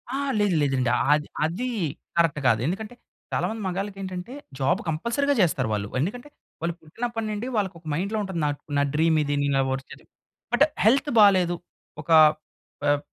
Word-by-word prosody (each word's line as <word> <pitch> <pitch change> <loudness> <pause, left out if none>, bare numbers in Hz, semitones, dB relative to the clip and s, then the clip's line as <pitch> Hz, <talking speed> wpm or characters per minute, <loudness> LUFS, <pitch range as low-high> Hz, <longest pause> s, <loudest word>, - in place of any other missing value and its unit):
ఆ! - - 0 0.2
లేదు 205 -4 +2
లేదండి. 135 -3 +1 0.2
అది, 150 0 0 0.2
అది 185 +11 -2 0.5
కరెక్ట్ 165 -3 +3
కాదు. 110 -2 +4
ఎందుకంటే 210 - -3 0.4
చాలామంది 220 0 -1
మగాళ్ళకి 195 +2 -3
ఏంటంటే 185 +5 -6 0.3
జాబ్ 135 0 +2
కంపల్సరీగా 235 - 0
చేస్తారు 135 -9 +1
వాళ్ళు. 100 -1 -2
ఎందుకంటే 245 - -3 0.3
వాళ్ళు 170 0 -1
పుట్టినప్పటి 225 +8 -4
నుండి 210 +4 -4
వాళ్ళకి 195 -3 -1
ఒక 165 - -30
మైండ్‌లో 200 +7 -1
ఉంటుంది. 190 -3 -4
నా - - +2 0.3
నా 140 - +3
డ్రీమ్ 160 +1 +3
ఇది, 145 0 -1
నేను 140 -1 +2
వర్క్ 130 0 -6 0.5
బట్ 240 +4 +5 0.2
హెల్త్ 275 +6 +4
బాలేదు. 185 -4 +5 0.5
ఒక 155 - -18 0.8
ఆహ్, 145 0 +3
180 Hz, 155 wpm, -25 LUFS, 150-215 Hz, 0.8 s, బట్